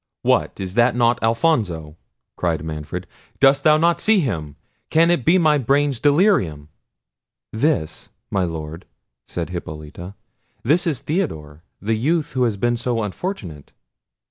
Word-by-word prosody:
"What, - - +1
is 95 0 -5
not 120 +1 +3
that 120 -1 +2
Alfonso?" 110 - 0 0.4
cried 80 -3 -1
Manfred. 75 -2 -5 0.3
"Dost 135 0 +4
thou 155 0 +5
not 170 +2 +2
see 220 -2 +3
him? 80 - -3 0.3
can 165 +2 +4
it 170 -8 +1
be 170 +7 +4
my 155 -4 +3
brain's 140 0 +1
delirium?" 145 - +2 0.8
"This! 110 - -1 0.2
my 95 - +1
Lord," 80 0 -6 0.4
said 85 -1 -4
Hippolita; 85 +2 -7 0.5
"this 165 +8 +2
is 140 -6 -1
Theodore, 85 - -3 0.2
the 110 +3 -1
youth 150 +7 0
who 130 -2 +1
has 110 -4 -1
been 120 +3 0
so 120 -1 -1
unfortunate." 100 - -6
115 Hz, 140 wpm, -21 LUFS, -, 0.8 s, thou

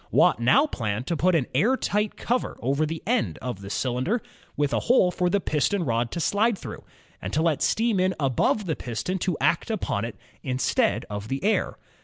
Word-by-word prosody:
Watt - - +4
now 130 - +5
planned 110 - -3
to 170 - -1
put 180 +3 +2
an 145 -6 +2
air 220 - +3
tight 210 -2 -1
cover 245 +2 -1
over 140 +5 0
the 160 +1 -5
end 240 +3 0
of 125 -6 -5
the 100 - -8
cylinder, 130 - 0 0.4
with 145 -1 +1
a - - +2
hole 195 -8 +5
for 180 0 0
the 200 - +2
piston 175 +3 0
rod 115 -1 0
to 170 - -4
slide 205 +6 +2
through, - - -8 0.4
and 95 - -4
to 155 - +2
let 165 -4 +1
steam 225 -3 +2
in 185 0 +2
above 140 - +1
the 160 -4 -1
piston 155 - -3
to 175 -3 -1
act 155 +9 +1
upon 185 - -1
it, 115 -1 -5 0.3
instead 130 -1 0
of 105 0 -5
the 135 +3 -3
air. 215 +2 +1
160 Hz, 205 wpm, -25 LUFS, 125-200 Hz, 0.4 s, now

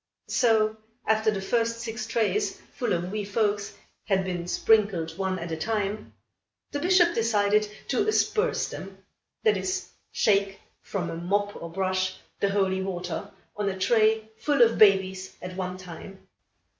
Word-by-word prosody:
So, 220 -2 +3 0.3
after 220 0 +3
the 195 -3 -2
first 230 +2 0
six 225 -1 -4
trays 235 - 0
full 240 -5 -2
of 175 +1 -1
wee 210 0 -2
folks 205 0 0 0.3
had 190 -2 +1
been 175 -2 -3
sprinkled, 190 -6 +2
one 190 0 -1
at 170 -1 -6
a - - -1
time, 205 +4 -2 0.6
the 290 - -2
Bishop 350 +1 +4
decided 210 -3 +2 0.2
to 420 - +1
"asperse" 435 +2 +1
them, - - -8 0.5
that 435 -2 +4
is, 380 0 -3 0.2
shake, 200 -2 +2 0.2
from 175 -4 -3
a - - -4
mop 205 +4 -1
or 170 - -7
brush, 185 0 -1 0.2
the 200 - +2
holy 190 -1 +1
water, 190 +1 -4 0.3
on 205 -1 -1
a 190 - -4
tray 220 +2 +3
full 285 -4 +3
of 230 -1 +2
babies 190 -2 +4
at 180 0 -7
one 185 -1 -3
time. 185 +2 -11
205 Hz, 155 wpm, -27 LUFS, 185-225 Hz, 0.6 s, Bishop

